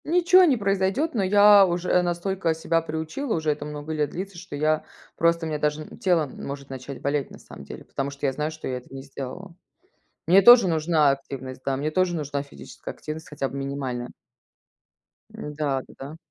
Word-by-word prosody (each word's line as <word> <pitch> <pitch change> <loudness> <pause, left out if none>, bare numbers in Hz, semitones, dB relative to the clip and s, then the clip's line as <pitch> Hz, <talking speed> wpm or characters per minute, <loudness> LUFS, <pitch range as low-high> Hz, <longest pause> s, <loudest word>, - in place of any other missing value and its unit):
Ниче 360 +3 +5
не 270 -5 +3
произойдет, 200 - 0
но 225 - 0
я 205 +1 +7
уже 180 0 +1
настолько 175 -1 -1
себя 165 +1 0
приучила, 160 - -3
уже 160 -2 0
это 145 0 -4
много 150 +1 -6
лет 150 -2 0
длится, 190 +1 -6
что 185 -4 -8
я 155 +1 +1 0.3
просто 170 0 +2
мне 155 -2 -3
даже 150 +1 -1
н - - -13
тело 175 -5 +2
может 140 0 -8
начать 130 +1 -8
болеть, 140 0 -1
на - - -12
самом - - -12
деле, - - -9
потому 140 0 -3
что 140 +1 -6
я 135 - +2
знаю, 150 +3 -2
что 155 0 -8
я 130 - -2
это 125 - -13
не 135 0 -7
сделала. 140 +7 -8 0.7
Мне 190 +3 +7
тоже 235 -2 +8
нужна 160 -2 +3
активность, 130 -1 -5
да, 135 - 0
мне 145 +3 -2
тоже 180 +1 +1
нужна 145 -3 -3
физическая 140 - -10
активность, 155 +1 -7
хотя 140 -2 -3
бы 140 - -7
минимальная. 135 -3 -4 1.2
Да, 150 -2 -3
да-да. 140 +4 -10
155 Hz, 190 wpm, -25 LUFS, 140-185 Hz, 1.2 s, тоже